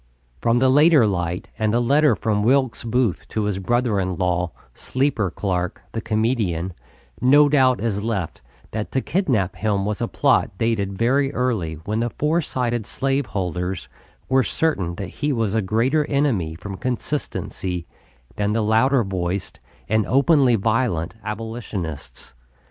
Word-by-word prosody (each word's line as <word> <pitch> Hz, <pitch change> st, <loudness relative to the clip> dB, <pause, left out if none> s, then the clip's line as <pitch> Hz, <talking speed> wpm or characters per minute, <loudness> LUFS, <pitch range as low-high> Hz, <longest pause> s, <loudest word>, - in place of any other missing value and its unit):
From 115 Hz, +1 st, +2 dB
the 130 Hz, +2 st, +4 dB
later 145 Hz, -1 st, +6 dB
light 90 Hz, -3 st, -2 dB
and 110 Hz, -1 st, +1 dB
the 120 Hz, -, +2 dB
letter 140 Hz, +1 st, +4 dB
from 105 Hz, -1 st, 0 dB
Wilkes 125 Hz, +1 st, +2 dB
Booth 120 Hz, -4 st, 0 dB
to 110 Hz, -, -2 dB
his 105 Hz, -2 st, -1 dB
brother 120 Hz, +1 st, +1 dB
in 95 Hz, -1 st, -1 dB
law, 90 Hz, -1 st, 0 dB, 0.2 s
Sleeper 130 Hz, -, -1 dB
Clarke, 90 Hz, -1 st, -3 dB
the 115 Hz, -, -3 dB
comedian, 110 Hz, -6 st, 0 dB, 0.5 s
no 145 Hz, +4 st, +6 dB
doubt 130 Hz, -3 st, +3 dB
is 105 Hz, -3 st, -1 dB
left 100 Hz, -6 st, -3 dB, 0.3 s
that 110 Hz, -1 st, -4 dB
to 130 Hz, -, +1 dB
kidnap 125 Hz, -, 0 dB
him 100 Hz, -2 st, 0 dB
was 105 Hz, +1 st, -2 dB
a 120 Hz, -, 0 dB
plot 130 Hz, -9 st, +1 dB
dated 100 Hz, -4 st, -1 dB
very 135 Hz, +5 st, +2 dB
early 110 Hz, -11 st, -1 dB
when 105 Hz, +2 st, -1 dB
the 120 Hz, +1 st, 0 dB
foresighted 125 Hz, -7 st, -1 dB
slave 135 Hz, -1 st, -1 dB
holders 90 Hz, -3 st, -3 dB, 0.4 s
were 130 Hz, 0 st, +4 dB
certain 100 Hz, -, -1 dB
that 95 Hz, 0 st, -5 dB
he 150 Hz, 0 st, +1 dB
was 115 Hz, -6 st, 0 dB
a 110 Hz, -, +2 dB
greater 115 Hz, +10 st, +1 dB
enemy 130 Hz, -, 0 dB
from 95 Hz, +3 st, -7 dB
consistency 110 Hz, -, -3 dB, 0.5 s
than 105 Hz, 0 st, 0 dB
the 110 Hz, 0 st, +1 dB
louder 115 Hz, +4 st, +3 dB
voiced 95 Hz, -1 st, -3 dB, 0.3 s
and 110 Hz, -1 st, +1 dB
openly 135 Hz, -1 st, +4 dB
violent 110 Hz, -5 st, 0 dB
Abolitionists. 105 Hz, -, -6 dB
110 Hz, 150 wpm, -22 LUFS, 95-130 Hz, 0.5 s, later